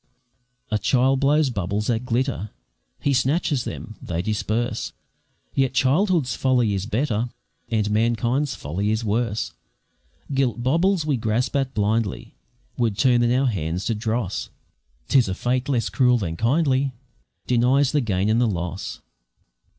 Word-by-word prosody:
A 105 - +1
child 130 +3 +2
blows 145 0 +3
bubbles 100 0 -2
that 115 +1 -1
glitter, 120 -3 -1 0.5
He 140 - +1
snatches 135 +1 +1
them, 110 -2 -7
they 85 0 -3
disperse; 110 +2 -2 0.6
Yet 135 -1 +1
childhood's 145 - +2
folly 125 -5 +2
is 95 +1 -2
better, 120 -1 0 0.4
And 105 -3 0
manhood's 120 +6 +1
folly 90 +9 -2
is 110 +1 0
worse; 110 0 -1 0.8
Gilt 125 -3 0
baubles 165 +5 +2
we 145 -4 +1
grasp 115 +4 -1
at 135 -2 0
blindly 105 0 -1 0.4
Would 115 -5 0
turn 120 +1 +4
in 120 0 +2
our 130 +2 +2
hands 90 -5 -1
to 115 - +1
dross; 110 -2 -2 0.6
'Tis 125 -7 +4
a 95 - -2
fate 125 +5 -1
less 125 -4 +1
cruel 125 -2 +3
than 85 -7 -3
kindly 135 - +1 0.5
Denies 125 +3 +3
the 150 - +2
gain 100 -4 0
and 110 +2 +3
the 120 - +3
loss. 90 -1 -4
120 Hz, 145 wpm, -23 LUFS, 105-135 Hz, 0.8 s, turn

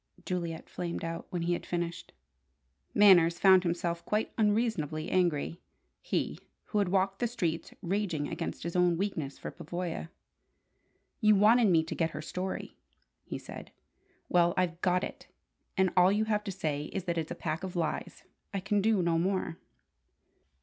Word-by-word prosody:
Juliet 170 -3 -3
flamed 170 -1 -4
out, 165 0 -4
when 175 -2 -2
he 175 +1 +1
had - - -3
finished. 170 -1 -4 0.8
Manners 175 -5 +7
found 190 0 +7
himself 170 -1 -2
quite 210 +1 -1
unreasonably 210 -9 0
angry: 170 -2 +1 0.4
he, - - -2 0.2
who 210 - -1
had 200 -3 +1
walked 195 +1 +1
the 240 - +1
streets 170 -8 -2
raging 180 -5 -1
against - - -4
his 170 +2 -4
own 180 -1 +3
weakness 165 -8 -2
for - - -6
Pavoya! 170 0 -5 1.1
"You 215 -2 +5
wanted 220 +3 +6
me 165 -4 +4
to 160 - -5
get 165 -1 0
her - - -4
story," 185 +4 -4 0.5
he - - -6
said. - - -10 0.6
"Well, 175 -1 +3
I've 175 -1 0
got 180 0 +2
it, - - -7 0.5
and 190 -1 +3
all 180 +1 +6
you 210 +2 +2
have 210 -1 0
to 200 - -2
say 155 -6 -2
is 195 +3 -4
that 170 -2 -1
it's 160 - -4
a 175 - -4
pack 165 +1 -3
of 185 -1 -5
lies. 165 -3 -3 0.3
I - - +1
can 205 +2 +1
do 210 -3 +3
no 165 -1 +2
more." 185 -2 -1
180 Hz, 165 wpm, -30 LUFS, 170-195 Hz, 1.1 s, Manners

